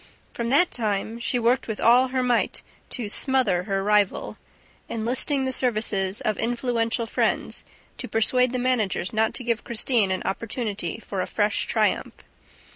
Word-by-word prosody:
From 235 Hz, 0 st, -3 dB
that 300 Hz, +7 st, +4 dB
time, 220 Hz, 0 st, -2 dB
she 250 Hz, +1 st, -1 dB
worked 240 Hz, +2 st, +1 dB
with 220 Hz, -2 st, -4 dB
all 245 Hz, +3 st, +5 dB
her 255 Hz, 0 st, -1 dB
might 245 Hz, -2 st, 0 dB, 0.3 s
to 240 Hz, -5 st, -3 dB
"smother" 210 Hz, -6 st, +1 dB
her 195 Hz, -1 st, -1 dB
rival, 205 Hz, -1 st, +1 dB, 0.5 s
enlisting 255 Hz, +5 st, 0 dB
the 260 Hz, -, -1 dB
services 210 Hz, -6 st, 0 dB
of 215 Hz, -, -1 dB
influential 235 Hz, -1 st, 0 dB
friends 225 Hz, -, -1 dB, 0.4 s
to -, -, -5 dB
persuade 250 Hz, +3 st, +2 dB
the 255 Hz, -, -2 dB
managers 235 Hz, -7 st, 0 dB
not 220 Hz, 0 st, +1 dB
to 255 Hz, -, -3 dB
give 235 Hz, -1 st, -1 dB
Christine 230 Hz, -2 st, +2 dB
an 185 Hz, 0 st, -1 dB
opportunity 220 Hz, 0 st, -3 dB
for 200 Hz, -4 st, -4 dB
a -, -, -3 dB
fresh 205 Hz, -1 st, +1 dB
triumph. -, -, 0 dB
230 Hz, 155 wpm, -24 LUFS, 210-250 Hz, 0.5 s, all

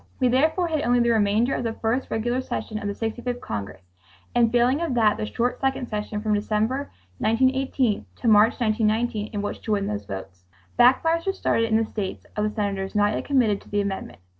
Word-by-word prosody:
We 255 Hz, -2 st, +3 dB
therefore 315 Hz, +8 st, +2 dB
had 310 Hz, -2 st, 0 dB
only 245 Hz, -3 st, +2 dB
the 235 Hz, 0 st, +3 dB
remainder 220 Hz, +3 st, +2 dB
of -, -, -2 dB
the 230 Hz, -1 st, -2 dB
first 230 Hz, +4 st, -1 dB
regular 240 Hz, +3 st, -1 dB
session 215 Hz, -4 st, -4 dB
of 205 Hz, -, -4 dB
the 200 Hz, +3 st, -3 dB
65th 245 Hz, +2 st, -5 dB
Congress 100 Hz, -, -6 dB, 0.5 s
and, 235 Hz, -2 st, +3 dB
failing 245 Hz, +5 st, +3 dB
of 330 Hz, -7 st, -1 dB
that, 220 Hz, -3 st, +4 dB
the 215 Hz, -, -3 dB
short 245 Hz, +2 st, -1 dB
second 265 Hz, -2 st, -1 dB
session 210 Hz, 0 st, -4 dB
from 215 Hz, -1 st, +1 dB
December, 220 Hz, +6 st, 0 dB, 0.3 s
1918, 260 Hz, -, +1 dB
to -, -, -4 dB
March, 215 Hz, +2 st, +5 dB
1919, 220 Hz, -1 st, 0 dB
in 205 Hz, -2 st, -3 dB
which 205 Hz, -, -4 dB
to 215 Hz, -, -1 dB
win 200 Hz, -1 st, 0 dB
those 105 Hz, -1 st, -4 dB
votes. 95 Hz, -2 st, -8 dB, 0.3 s
Backfires 325 Hz, +8 st, +4 dB
were 390 Hz, -, +2 dB
started 230 Hz, -11 st, +1 dB
in 220 Hz, -1 st, +2 dB
the 225 Hz, -, +1 dB
states 205 Hz, -3 st, -5 dB
of 210 Hz, -, 0 dB
the 215 Hz, -, +1 dB
senators 200 Hz, -2 st, -3 dB
not 205 Hz, 0 st, +3 dB
yet -, -, -3 dB
committed 240 Hz, -8 st, +2 dB
to -, -, -18 dB
the 205 Hz, 0 st, +1 dB
amendment. 200 Hz, -1 st, -4 dB
225 Hz, 210 wpm, -24 LUFS, 210-250 Hz, 0.5 s, March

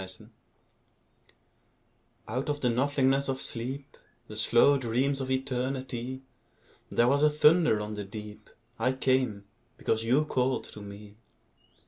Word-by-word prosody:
The 95 Hz, -, -6 dB, 2.2 s
Call 110 Hz, -, -4 dB
Out 135 Hz, -, -4 dB
of 145 Hz, 0 st, -2 dB
the 125 Hz, -, +2 dB
nothingness 135 Hz, +2 st, +2 dB
of 135 Hz, 0 st, -1 dB
sleep, 135 Hz, +4 st, -5 dB, 0.3 s
The 105 Hz, -, -8 dB
slow 120 Hz, +6 st, +4 dB
dreams 130 Hz, +3 st, 0 dB
of 130 Hz, -, -4 dB
Eternity, 130 Hz, -1 st, -3 dB, 0.7 s
There 120 Hz, -, +3 dB
was 140 Hz, +3 st, +3 dB
a 150 Hz, -, +6 dB
thunder 150 Hz, -5 st, +4 dB
on 105 Hz, 0 st, -4 dB
the 105 Hz, -1 st, -4 dB
deep: 105 Hz, +1 st, -9 dB, 0.3 s
I 130 Hz, +3 st, +2 dB
came, 130 Hz, -6 st, 0 dB, 0.3 s
because 110 Hz, 0 st, 0 dB
you 130 Hz, +7 st, +3 dB
called 130 Hz, -2 st, 0 dB
to 105 Hz, -, -10 dB
me. 100 Hz, +1 st, -11 dB
130 Hz, 135 wpm, -29 LUFS, 110-135 Hz, 2.2 s, a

